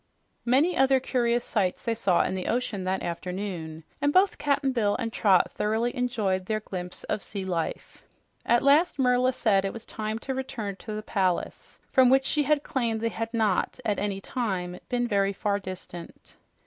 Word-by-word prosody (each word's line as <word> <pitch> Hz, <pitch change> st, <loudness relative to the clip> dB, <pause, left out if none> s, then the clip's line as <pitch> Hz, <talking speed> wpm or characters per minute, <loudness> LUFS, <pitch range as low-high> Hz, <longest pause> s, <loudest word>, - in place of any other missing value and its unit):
Many 280 Hz, +9 st, +3 dB
other 270 Hz, 0 st, +4 dB
curious 240 Hz, -2 st, 0 dB
sights 190 Hz, -5 st, -1 dB
they 230 Hz, -, 0 dB
saw 200 Hz, -6 st, +2 dB
in -, -, -2 dB
the 185 Hz, -1 st, -3 dB
ocean 225 Hz, -5 st, -1 dB
that 190 Hz, +1 st, -1 dB
afternoon, 175 Hz, -2 st, -5 dB, 0.2 s
and 290 Hz, -, +3 dB
both 375 Hz, +4 st, +3 dB
Cap'n 280 Hz, -2 st, +1 dB
Bill 215 Hz, -5 st, +1 dB
and 230 Hz, 0 st, -3 dB
Trot 190 Hz, -4 st, +3 dB
thoroughly 225 Hz, +4 st, -1 dB
enjoyed 210 Hz, -7 st, -1 dB
their 215 Hz, -1 st, 0 dB
glimpse 180 Hz, -4 st, -7 dB
of 215 Hz, -, -2 dB
sea 195 Hz, -2 st, -5 dB
life. 175 Hz, -3 st, -4 dB, 0.4 s
At 240 Hz, 0 st, +3 dB
last 295 Hz, +5 st, +4 dB
Merla 250 Hz, -1 st, +3 dB
said 215 Hz, -6 st, +2 dB
it 195 Hz, -, -2 dB
was 230 Hz, -, -9 dB
time 215 Hz, 0 st, -4 dB
to 265 Hz, +3 st, -4 dB
return 240 Hz, -6 st, -4 dB
to 215 Hz, -, -7 dB
the 215 Hz, -, -5 dB
palace, 185 Hz, -4 st, -2 dB
from 260 Hz, -1 st, +6 dB
which 265 Hz, +1 st, +4 dB
she 300 Hz, +1 st, +1 dB, 0.2 s
claimed 235 Hz, -4 st, -1 dB
they 230 Hz, +1 st, 0 dB
had 225 Hz, 0 st, -4 dB
not 220 Hz, -1 st, 0 dB
at 210 Hz, -2 st, 0 dB
any 200 Hz, -1 st, -2 dB
time 185 Hz, -6 st, -3 dB
been 245 Hz, -1 st, 0 dB
very 200 Hz, -2 st, +1 dB
far 200 Hz, +1 st, -1 dB
distant. 185 Hz, -2 st, -9 dB
220 Hz, 180 wpm, -27 LUFS, 190-250 Hz, 0.4 s, from